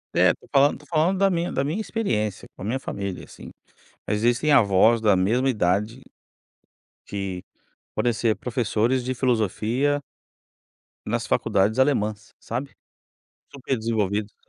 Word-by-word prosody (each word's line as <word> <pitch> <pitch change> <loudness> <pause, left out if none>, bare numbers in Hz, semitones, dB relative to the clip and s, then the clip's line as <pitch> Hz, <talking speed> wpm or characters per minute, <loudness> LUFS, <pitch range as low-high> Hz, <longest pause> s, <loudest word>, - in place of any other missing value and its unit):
É, - - +5
estou - - -11
falando 140 +1 +5
estou 150 - -19
falando 170 +4 +1
da 195 0 +3
minha, 175 -1 -1
da 135 - 0
minha 160 +10 -2
experiência 110 - -2
com - - -14
a - - -5
minha 120 +6 -1
família 100 -7 -5
assim. - - -12 0.6
Mas 105 - 0
existem 120 +7 +2
avós 110 -2 +5
da 105 -3 +4
mesma 115 +9 +2
idade 105 +3 0 1.1
que 95 -3 -4 0.5
podem 120 - +2
ser 110 -1 0
professores 120 +1 0
de 130 +1 -2
filosofia 125 +4 0 1.1
nas - - -2
faculdades 105 +2 +1
alemãs, 110 -6 0
sabe. 125 +5 -5 0.8
Super 135 -2 -3
desenvolvidos. 105 -2 -1
115 Hz, 135 wpm, -24 LUFS, 105-135 Hz, 1.1 s, É